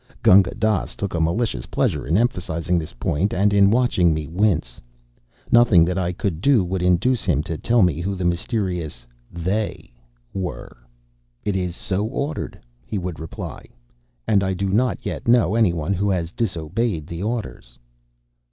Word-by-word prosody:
] -, -, -27 dB
Gunga 95 Hz, -5 st, +6 dB
Dass 110 Hz, -4 st, 0 dB
took 100 Hz, -, -4 dB
a 85 Hz, -, 0 dB
malicious 85 Hz, -, -1 dB
pleasure -, -, -1 dB
in 80 Hz, +5 st, +2 dB
emphasizing 90 Hz, -7 st, 0 dB
this 80 Hz, -, -6 dB
point 80 Hz, +10 st, -1 dB
and 100 Hz, +2 st, +2 dB
in 100 Hz, -1 st, +5 dB
watching 100 Hz, -8 st, +3 dB
me 80 Hz, -1 st, -3 dB
wince. 80 Hz, -, 0 dB, 0.7 s
Nothing 115 Hz, -8 st, +6 dB
that 90 Hz, +2 st, -1 dB
I 90 Hz, -1 st, 0 dB
could 90 Hz, -3 st, -3 dB
do 130 Hz, -6 st, +4 dB
would 90 Hz, +1 st, -2 dB
induce 90 Hz, +8 st, +2 dB
him 75 Hz, +1 st, +1 dB
to 80 Hz, -, -4 dB
tell 115 Hz, +6 st, +2 dB
me 85 Hz, -3 st, +1 dB
who 95 Hz, +2 st, -2 dB
the 90 Hz, -1 st, -3 dB
mysterious 90 Hz, -, -2 dB, 0.3 s
"They" 95 Hz, -, -3 dB, 0.4 s
were. 95 Hz, -2 st, -5 dB, 0.7 s
"It 100 Hz, -2 st, -1 dB
is 90 Hz, -2 st, -2 dB
so 95 Hz, +2 st, -2 dB
ordered," 140 Hz, +6 st, -3 dB, 0.3 s
he 105 Hz, -, -4 dB
would 90 Hz, -3 st, -4 dB
reply, 80 Hz, 0 st, -7 dB, 0.6 s
"and 100 Hz, -2 st, +3 dB
I 95 Hz, -1 st, -1 dB
do 95 Hz, +1 st, -2 dB
not 120 Hz, +6 st, 0 dB
yet -, -, -4 dB
know 115 Hz, -6 st, +4 dB
any 110 Hz, -5 st, +3 dB
one 85 Hz, +3 st, -2 dB
who 100 Hz, +2 st, 0 dB
has 85 Hz, -3 st, -1 dB
disobeyed 90 Hz, -2 st, -2 dB
the 85 Hz, +2 st, -6 dB
orders." 105 Hz, -, -5 dB
95 Hz, 170 wpm, -22 LUFS, 85-110 Hz, 0.7 s, Gunga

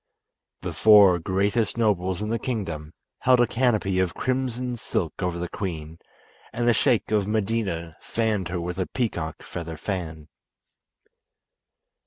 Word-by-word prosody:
The -, -, -3 dB
four 100 Hz, -5 st, +7 dB
greatest 100 Hz, +6 st, 0 dB
nobles 95 Hz, -4 st, +1 dB
in 105 Hz, -, -3 dB
the 115 Hz, +1 st, 0 dB
kingdom 85 Hz, -11 st, -4 dB, 0.3 s
held 125 Hz, -1 st, +4 dB
a 120 Hz, -, +6 dB
canopy 110 Hz, -6 st, +1 dB
of 95 Hz, -1 st, 0 dB
crimson 125 Hz, -1 st, -1 dB
silk 90 Hz, -8 st, -3 dB
over 90 Hz, -2 st, -1 dB
the 90 Hz, 0 st, -3 dB
queen, 80 Hz, -4 st, -5 dB, 0.5 s
and 120 Hz, 0 st, -1 dB
the 120 Hz, -, +6 dB
Sheik 115 Hz, +1 st, +2 dB
of 105 Hz, -2 st, +2 dB
Medina 100 Hz, -6 st, -1 dB
fanned 110 Hz, -5 st, -1 dB
her 90 Hz, 0 st, -3 dB
with 90 Hz, +2 st, -4 dB
a 95 Hz, -, 0 dB
peacock 85 Hz, -11 st, -3 dB
feather 85 Hz, -2 st, -6 dB
fan. 80 Hz, -4 st, -4 dB
100 Hz, 140 wpm, -25 LUFS, 85-115 Hz, 0.5 s, four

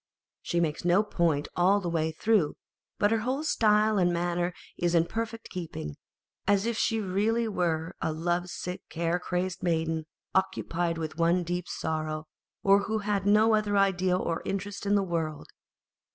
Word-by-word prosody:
She 175 Hz, -, -1 dB
makes 160 Hz, -3 st, -1 dB
no 175 Hz, +4 st, +4 dB
point 165 Hz, -8 st, 0 dB
all 190 Hz, +3 st, +4 dB
the 185 Hz, -, -4 dB
way 160 Hz, -2 st, 0 dB
through, 180 Hz, -1 st, +2 dB, 0.4 s
but 205 Hz, 0 st, +3 dB
her 225 Hz, -, +3 dB
whole 260 Hz, +6 st, -1 dB
style 215 Hz, -6 st, +3 dB
and 175 Hz, -1 st, +3 dB
manner 175 Hz, +1 st, 0 dB, 0.2 s
is 175 Hz, 0 st, 0 dB
in 165 Hz, 0 st, +4 dB
perfect 225 Hz, +4 st, -4 dB
keeping, 160 Hz, -, -5 dB, 0.5 s
as 200 Hz, 0 st, +3 dB
if 235 Hz, 0 st, 0 dB
she 225 Hz, 0 st, +1 dB
were 205 Hz, -, -4 dB
really 190 Hz, -5 st, 0 dB
a -, -, 0 dB
love 175 Hz, +3 st, -1 dB
sick, 180 Hz, +1 st, -5 dB
care 170 Hz, +1 st, 0 dB
crazed 180 Hz, 0 st, -2 dB
maiden, 160 Hz, -2 st, 0 dB, 0.3 s
occupied 175 Hz, -3 st, 0 dB
with 160 Hz, 0 st, -5 dB
one 170 Hz, +2 st, +3 dB
deep 175 Hz, +1 st, -3 dB
sorrow, 155 Hz, -1 st, -3 dB, 0.4 s
and 195 Hz, +1 st, +5 dB
who 220 Hz, -, -1 dB
had 205 Hz, -2 st, -1 dB
no 215 Hz, +2 st, +5 dB
other 210 Hz, -1 st, +2 dB
idea 185 Hz, -2 st, +3 dB
or 165 Hz, -2 st, -2 dB
interest 200 Hz, +1 st, -4 dB
in 205 Hz, -, +4 dB
the 200 Hz, -, +3 dB
world. 165 Hz, -4 st, -3 dB
180 Hz, 165 wpm, -28 LUFS, 165-205 Hz, 0.5 s, and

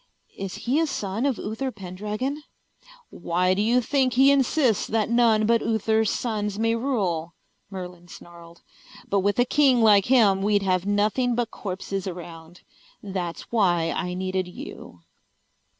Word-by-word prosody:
"Is 195 Hz, -1 st, -6 dB
he 260 Hz, +6 st, +2 dB
a 325 Hz, -, +1 dB
son 220 Hz, -2 st, -2 dB
of 265 Hz, -6 st, -1 dB
Uther 225 Hz, +6 st, -4 dB
Pendragon?" 210 Hz, +8 st, -5 dB, 0.7 s
"Why 180 Hz, +2 st, 0 dB
do 195 Hz, -, 0 dB
you 235 Hz, +4 st, +3 dB
think 260 Hz, +1 st, +1 dB
he 270 Hz, +2 st, +5 dB
insists 270 Hz, -4 st, +2 dB
that 220 Hz, 0 st, -1 dB
none 230 Hz, -3 st, +3 dB
but 230 Hz, +1 st, +3 dB
Uther's 220 Hz, -1 st, +1 dB
sons 210 Hz, -4 st, -2 dB
may 225 Hz, +1 st, +1 dB
rule?" 190 Hz, -, -2 dB, 0.3 s
Merlin 180 Hz, -2 st, -8 dB
snarled. 170 Hz, -1 st, -14 dB, 0.4 s
"But 200 Hz, -, +1 dB
with 200 Hz, +1 st, 0 dB
a 245 Hz, -, +4 dB
king 265 Hz, -3 st, +3 dB
like 205 Hz, -3 st, +5 dB
him 215 Hz, -7 st, +4 dB
we'd 205 Hz, 0 st, +2 dB
have 185 Hz, 0 st, 0 dB
nothing 215 Hz, +4 st, +1 dB
but 240 Hz, -1 st, -2 dB
corpses 195 Hz, 0 st, -5 dB
around. 170 Hz, -1 st, -9 dB, 0.4 s
That's 185 Hz, -4 st, -4 dB
why 175 Hz, -7 st, +2 dB
I 180 Hz, -1 st, -3 dB
needed 185 Hz, 0 st, -2 dB
you." 90 Hz, -, -10 dB
205 Hz, 150 wpm, -24 LUFS, 185-235 Hz, 0.7 s, he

